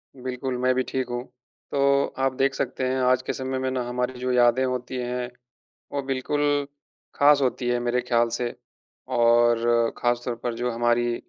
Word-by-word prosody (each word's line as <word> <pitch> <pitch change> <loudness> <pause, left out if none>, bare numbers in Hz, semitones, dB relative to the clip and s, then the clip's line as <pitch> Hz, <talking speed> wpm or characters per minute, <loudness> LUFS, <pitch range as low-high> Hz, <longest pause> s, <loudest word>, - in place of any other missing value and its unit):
बिल्कुल, 130 0 -4
मैं 130 +1 +2
भी 130 - +1
ठीक 130 -2 -2
हूँ। 120 0 -3 0.5
तो 140 0 +3
आप 135 0 +1
देख 135 +1 +1
सकते 130 0 -3
हैं 130 +1 0
आज 125 0 +3
के - - -3
समय 130 0 -3
में 130 0 -1
ना 130 -1 -1
हमारी 125 +1 -2
जो 125 0 -1
यादें 125 +1 +4
होती 125 0 -3
हैं 125 0 -3 0.6
वो 140 - -1
बिल्कुल 145 +2 0 0.5
ख़ास 145 0 +5
होती 125 -1 0
है, 120 0 +1
मेरे 120 +1 0
ख़्याल 120 -1 +1
से। 120 -1 -2 0.6
और 120 0 +3
ख़ासतौर 120 0 -1
पर 120 -1 -1
जो 125 +1 -2
हमारी 120 0 +1
125 Hz, 175 wpm, -25 LUFS, 120-130 Hz, 0.6 s, ख़ास